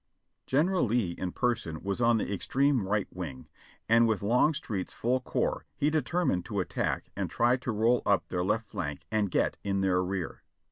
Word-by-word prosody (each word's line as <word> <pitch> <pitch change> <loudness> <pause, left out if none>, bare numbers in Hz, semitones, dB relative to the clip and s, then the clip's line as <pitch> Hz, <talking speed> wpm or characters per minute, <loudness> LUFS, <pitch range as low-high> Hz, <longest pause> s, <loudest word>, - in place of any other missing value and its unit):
General 165 +7 +2
Lee 115 -6 +1
in 90 +1 -4
person 110 -11 -1
was 100 +4 -2
on 120 -1 +4
the 105 - -2
extreme 130 +2 +1
right 105 0 0
wing, 75 -8 -6 0.4
and 115 +1 +5
with 110 -3 0
Longstreet's 115 - +1
full 125 +3 0
corps 125 - -1
he 145 +2 +1
determined 155 - +1
to 105 -4 -3
attack 90 - -2
and - - -2
try 120 +1 +3
to 125 -1 -3
roll 115 +3 +2
up 100 -3 +2
their 90 -1 -1
left 105 +4 0
flank 75 -8 -4
and 105 -2 +1
get - - +1
in 100 -1 0
their 90 -1 +2
rear. 90 -2 -4
105 Hz, 180 wpm, -29 LUFS, 95-125 Hz, 0.4 s, and